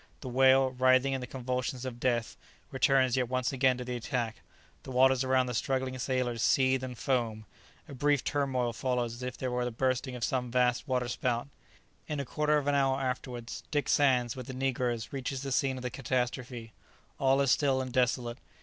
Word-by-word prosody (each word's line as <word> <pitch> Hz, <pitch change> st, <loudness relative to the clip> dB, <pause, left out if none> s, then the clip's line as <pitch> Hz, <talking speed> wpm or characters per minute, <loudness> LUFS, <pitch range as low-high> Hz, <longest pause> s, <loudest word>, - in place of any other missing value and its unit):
The 130 Hz, -, -6 dB
whale, 130 Hz, +1 st, +5 dB
writhing 130 Hz, +1 st, +3 dB
in 135 Hz, -, -2 dB
the 125 Hz, -, -6 dB
convulsions 125 Hz, 0 st, -3 dB
of 120 Hz, -2 st, -6 dB
death, 120 Hz, -2 st, 0 dB, 0.4 s
returns 130 Hz, -2 st, +3 dB
yet 125 Hz, -2 st, 0 dB
once 130 Hz, +1 st, -1 dB
again 130 Hz, -1 st, +3 dB
to 125 Hz, -, -6 dB
the 125 Hz, 0 st, -3 dB
attack; 120 Hz, -1 st, -2 dB, 0.4 s
the -, -, -11 dB
waters 130 Hz, 0 st, +4 dB
around 130 Hz, 0 st, +2 dB
the 125 Hz, -, -4 dB
struggling 130 Hz, +2 st, -1 dB
sailors 125 Hz, -3 st, -1 dB
seethe 130 Hz, 0 st, +3 dB
and 125 Hz, -2 st, -6 dB
foam. 115 Hz, -5 st, -1 dB, 0.4 s
A -, -, -9 dB
brief 145 Hz, +1 st, +1 dB
turmoil 130 Hz, -4 st, 0 dB
follows 125 Hz, -1 st, -1 dB
as 120 Hz, -, -10 dB
if 125 Hz, 0 st, -5 dB
there 130 Hz, -1 st, -3 dB
were 125 Hz, 0 st, 0 dB
the 125 Hz, -, -1 dB
bursting 130 Hz, +2 st, -1 dB
of 120 Hz, -, -5 dB
some 125 Hz, +2 st, -1 dB
vast 125 Hz, +2 st, +1 dB
waterspout. 125 Hz, 0 st, -1 dB, 0.6 s
In 150 Hz, -2 st, -3 dB
a 140 Hz, -, -2 dB
quarter 150 Hz, +3 st, +1 dB
of 145 Hz, -, -1 dB
an 145 Hz, -, +1 dB
hour 135 Hz, -1 st, +2 dB
afterwards, 125 Hz, -2 st, -4 dB
Dick 145 Hz, -2 st, 0 dB
Sands, 125 Hz, -4 st, +3 dB
with 130 Hz, -2 st, -7 dB
the 130 Hz, -, -6 dB
negroes, 125 Hz, -3 st, -1 dB
reaches 135 Hz, 0 st, -3 dB
the 135 Hz, -, -4 dB
scene 135 Hz, 0 st, +1 dB
of 125 Hz, -, -7 dB
the 125 Hz, -, -3 dB
catastrophe. 125 Hz, -2 st, -3 dB, 0.5 s
All 135 Hz, 0 st, +3 dB
is 140 Hz, -2 st, +3 dB
still 135 Hz, -1 st, +3 dB
and 130 Hz, -1 st, -4 dB
desolate. 125 Hz, -2 st, 0 dB
130 Hz, 195 wpm, -30 LUFS, 125-135 Hz, 0.6 s, whale